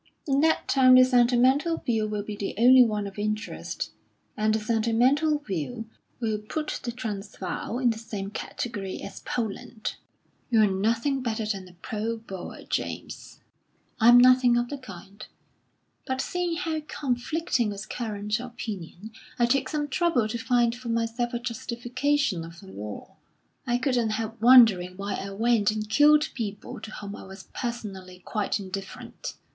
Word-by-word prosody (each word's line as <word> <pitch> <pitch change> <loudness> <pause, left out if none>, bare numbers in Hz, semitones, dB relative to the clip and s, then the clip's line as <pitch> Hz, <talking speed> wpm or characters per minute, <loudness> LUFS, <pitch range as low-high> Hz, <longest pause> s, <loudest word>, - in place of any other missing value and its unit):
In 275 -1 +2
that 320 +1 +2
time 255 -2 +6
the 255 - +9
sentimental 255 +6 +3
view 225 -6 0
will 210 -1 -3
be 210 0 -6
the 200 -1 -4
only 250 +3 +8
one 210 -3 -1
of 200 +1 -7
interest; 215 +1 -3 0.4
and 215 0 +2
the - - +1
sentimental 235 +8 +2
view 225 - -4 0.3
will 220 -3 -1
put 300 +9 -4
the 240 - -3
Transvaal 210 -2 -5
in 250 -2 +3
the 220 - -5
same 205 -3 -6
category 205 -3 -5
as - - -8
Poland." 225 0 -4 0.5
"You're 225 -3 +5
nothing 230 +8 0
better 225 -3 -2
than 195 -3 -3
a 180 - -15
pro 220 +5 -4
Boer, 195 -5 -8
James." - - -5 0.6
"I'm 240 +2 +8
nothing 250 -1 +6
of 240 0 0
the 285 - -5
kind; 200 -2 -11 0.8
but 260 -1 -1
seeing 355 +3 -1
how 320 -3 -2
conflicting 255 -1 -1
was 200 0 -6
current 210 -2 -3
opinion, 220 -5 -7 0.3
I 240 - +4
took 255 +2 +1
some 295 -1 -1
trouble 290 -6 +1
to 235 - -2
find 240 -1 +2
for 245 0 -7
myself 230 +1 -1
a - - -1
justification 245 - -1
of 165 +1 -11
the 190 0 -13
war. 105 0 -8 0.5
I 240 0 +2
couldn't 245 -3 +1
help 225 0 -5
wondering 220 -8 +6
why 200 0 -3
I 195 - -4
went 220 +1 +2
and 215 0 -2
killed 300 +6 +5
people 210 -5 -5
to 220 - -7
whom 205 -1 -7
I - - -10
was 190 0 -12
personally 200 -7 -5
quite 210 -1 -1
indifferent." 195 0 -7
230 Hz, 155 wpm, -26 LUFS, 205-255 Hz, 0.8 s, the